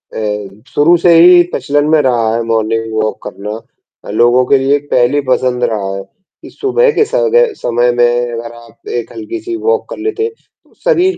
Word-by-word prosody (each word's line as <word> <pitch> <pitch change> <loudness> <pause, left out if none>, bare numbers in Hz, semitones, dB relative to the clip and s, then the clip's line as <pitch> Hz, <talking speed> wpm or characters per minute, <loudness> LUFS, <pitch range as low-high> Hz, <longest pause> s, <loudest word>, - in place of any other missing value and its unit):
अ, 105 -1 -5
शुरू 160 +4 +4
से 175 - +5
ही 175 +1 +7
प्रचलन 145 0 0
में 160 -1 +4
रहा 120 -4 +1
है 115 - -1
मॉर्निंग 115 0 -1
वॉक 110 0 -1
करना। 105 +2 -7 0.5
लोगों 120 +3 +3
के 140 - +3
लिए 135 +2 +2
एक 145 0 -4
पहली 125 +4 +2
पसंद 125 -1 0
रहा 100 -4 -2
है, 100 - -5
कि 190 - -19
सुबह 455 +4 +1
के 440 - +1
सग 480 0 0
अ, 485 0 +6 0.2
समय 120 +1 +1
में 120 0 +1
अगर 115 0 -6
आप 120 0 -17
एक - - -8
हल्की-सी 350 +1 -6
वॉक 460 +2 0
कर - - -7
लेते 435 0 -2
हैं, 450 - -2 0.3
तो - - -29
शरीर 375 -7 +2
125 Hz, 195 wpm, -13 LUFS, -, 0.5 s, ही